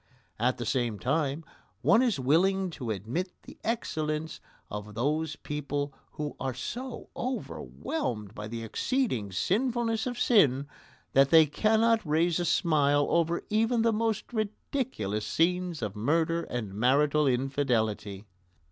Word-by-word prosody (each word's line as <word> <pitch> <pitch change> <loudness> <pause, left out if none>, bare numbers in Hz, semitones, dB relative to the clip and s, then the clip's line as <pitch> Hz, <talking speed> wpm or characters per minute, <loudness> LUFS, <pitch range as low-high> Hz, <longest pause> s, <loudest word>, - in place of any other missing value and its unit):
At 125 +3 +1
the 120 - -4
same 120 -3 0
time 140 +5 -1 0.4
one 215 +4 +5
is 240 - +1
willing 180 +8 +2
to 125 -7 -6
admit 115 - -2
the - - -13
excellence 155 -9 -2 0.3
of 105 0 -7
those 150 +5 0
people 145 -1 -3 0.2
who 150 -1 -4
are 130 -2 -2
so 245 - -6
overwhelmed 245 - -4
by 105 - -6
the 115 +1 -5
exceeding 125 - -1
sinfulness 225 - 0
of 245 -1 -4
sin 140 - +4 0.5
that 135 0 +5
they 160 -1 +8
cannot 220 +8 +2
raise 165 +2 +2
a 175 - 0
smile 145 -4 +3
over 170 0 +1
even 225 +2 +2
the 230 -1 +3
most 220 +1 -1
ridiculous 215 - -2
scenes 175 +3 0
of 105 -1 -3
murder 165 +9 +1
and 110 -5 -4
marital 140 +7 +3
infidelity. 120 -6 0
150 Hz, 130 wpm, -29 LUFS, 125-205 Hz, 0.5 s, they